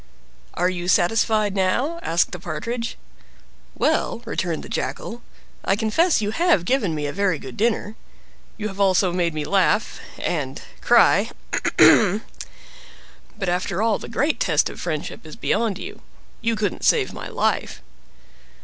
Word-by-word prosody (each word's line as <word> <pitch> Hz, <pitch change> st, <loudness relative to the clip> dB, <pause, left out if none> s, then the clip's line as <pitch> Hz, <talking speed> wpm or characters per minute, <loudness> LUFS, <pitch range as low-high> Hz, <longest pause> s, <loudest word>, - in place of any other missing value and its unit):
"Are 180 Hz, -, +2 dB
you 180 Hz, -1 st, -3 dB
satisfied 215 Hz, +3 st, +2 dB
now?" 225 Hz, -, 0 dB
asked 170 Hz, -, +1 dB
the 180 Hz, -, -6 dB
Partridge. 230 Hz, +8 st, -4 dB, 0.8 s
"Well," 235 Hz, -, 0 dB
returned 175 Hz, -7 st, -2 dB
the -, -, -8 dB
Jackal, 235 Hz, +1 st, -4 dB, 0.4 s
"I 195 Hz, -, +2 dB
confess 220 Hz, -, +2 dB
you 205 Hz, -, -1 dB
have 335 Hz, -, +2 dB
given 205 Hz, -8 st, +1 dB
me 150 Hz, -1 st, -3 dB
a 145 Hz, -, -3 dB
very 200 Hz, -4 st, +1 dB
good 130 Hz, -3 st, -9 dB
dinner; 215 Hz, -1 st, 0 dB, 0.6 s
you 215 Hz, -, -3 dB
have 195 Hz, -1 st, -9 dB
also 190 Hz, -2 st, +3 dB
made 170 Hz, -3 st, 0 dB
me 150 Hz, -1 st, -2 dB
laugh—and 200 Hz, +2 st, -1 dB, 0.2 s
cry—ahem! 210 Hz, +1 st, +4 dB, 1.1 s
But, 195 Hz, -3 st, -3 dB
after 180 Hz, +2 st, -1 dB
all, 225 Hz, -2 st, +2 dB
the -, -, -9 dB
great 285 Hz, +6 st, 0 dB
test 155 Hz, -4 st, +2 dB
of -, -, -10 dB
friendship 155 Hz, -4 st, -4 dB
is 155 Hz, -2 st, -10 dB
beyond 215 Hz, -3 st, 0 dB
you—you 230 Hz, +3 st, -6 dB
couldn't 210 Hz, -3 st, -2 dB
save -, -, +3 dB
my -, -, -7 dB
life!" -, -, -1 dB
200 Hz, 140 wpm, -22 LUFS, 175-225 Hz, 1.1 s, cry—ahem